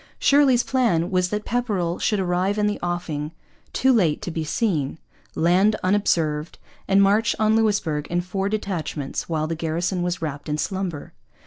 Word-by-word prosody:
Shirley's 275 Hz, -4 st, +4 dB
plan 225 Hz, -11 st, +1 dB
was 180 Hz, -1 st, +1 dB
that 210 Hz, +1 st, -3 dB
Pepperrell 205 Hz, -8 st, -1 dB
should 210 Hz, -, +1 dB
arrive 185 Hz, +2 st, 0 dB
in 210 Hz, -, +2 dB
the 210 Hz, 0 st, -1 dB
offing 165 Hz, -3 st, -3 dB, 0.4 s
too 265 Hz, 0 st, +3 dB
late 175 Hz, -10 st, +2 dB
to 175 Hz, -, -4 dB
be 160 Hz, -1 st, -3 dB
seen, 155 Hz, -, -1 dB, 0.4 s
land 185 Hz, +6 st, +3 dB
unobserved, 165 Hz, -6 st, 0 dB, 0.3 s
and 195 Hz, +1 st, +5 dB
march 205 Hz, +3 st, +3 dB
on 215 Hz, 0 st, +3 dB
Louisbourg 205 Hz, -9 st, 0 dB
in 175 Hz, +1 st, 0 dB
four 190 Hz, +2 st, -2 dB
detachments 170 Hz, -11 st, -3 dB
while 155 Hz, -2 st, 0 dB
the 160 Hz, -, -2 dB
garrison 170 Hz, +3 st, -2 dB
was 175 Hz, 0 st, -1 dB
wrapped 150 Hz, -2 st, -5 dB
in 150 Hz, -, -1 dB
slumber. 185 Hz, -2 st, -4 dB
180 Hz, 160 wpm, -23 LUFS, 160-210 Hz, 0.4 s, and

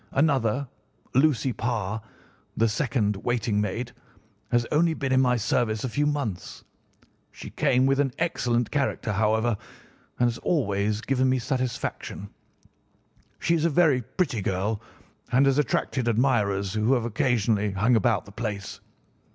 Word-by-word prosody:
Another, 135 Hz, -3 st, +1 dB, 0.5 s
Lucy 135 Hz, -2 st, +2 dB
Parr, 110 Hz, -3 st, -2 dB, 0.6 s
the 115 Hz, -, +3 dB
second 110 Hz, -3 st, 0 dB
waiting 110 Hz, -1 st, 0 dB
maid, 115 Hz, +4 st, -3 dB, 0.6 s
has 120 Hz, -1 st, +2 dB
only 160 Hz, +1 st, +3 dB
been 135 Hz, -3 st, -2 dB
in 130 Hz, 0 st, +4 dB
my 125 Hz, -1 st, +3 dB
service 110 Hz, -1 st, 0 dB
a 130 Hz, -, -1 dB
few 145 Hz, +5 st, 0 dB
months. 130 Hz, -11 st, -3 dB, 0.7 s
She -, -, -10 dB
came 130 Hz, +1 st, +2 dB
with 135 Hz, +1 st, +2 dB
an 140 Hz, -2 st, +2 dB
excellent 120 Hz, -8 st, 0 dB
character, 140 Hz, -6 st, -1 dB
however, 110 Hz, +3 st, +1 dB, 0.6 s
and 120 Hz, -, +4 dB
has 115 Hz, -1 st, -3 dB
always 105 Hz, -, 0 dB
given 130 Hz, +1 st, +1 dB
me 130 Hz, -, +2 dB
satisfaction. 125 Hz, -5 st, -3 dB, 1.1 s
She 170 Hz, -, 0 dB
is 165 Hz, -2 st, +1 dB
a -, -, +4 dB
very 150 Hz, -5 st, +3 dB
pretty 125 Hz, -, -2 dB
girl 100 Hz, +3 st, -1 dB, 0.5 s
and 130 Hz, +3 st, +4 dB
has 135 Hz, +1 st, +3 dB
attracted 130 Hz, -3 st, 0 dB
admirers 105 Hz, -5 st, +1 dB
who 110 Hz, +4 st, +2 dB
have 120 Hz, -2 st, -1 dB
occasionally 110 Hz, -3 st, +1 dB
hung 110 Hz, +6 st, +3 dB
about 110 Hz, -, +2 dB
the 100 Hz, -, -13 dB
place. 105 Hz, -3 st, -5 dB
120 Hz, 145 wpm, -26 LUFS, 105-135 Hz, 1.1 s, in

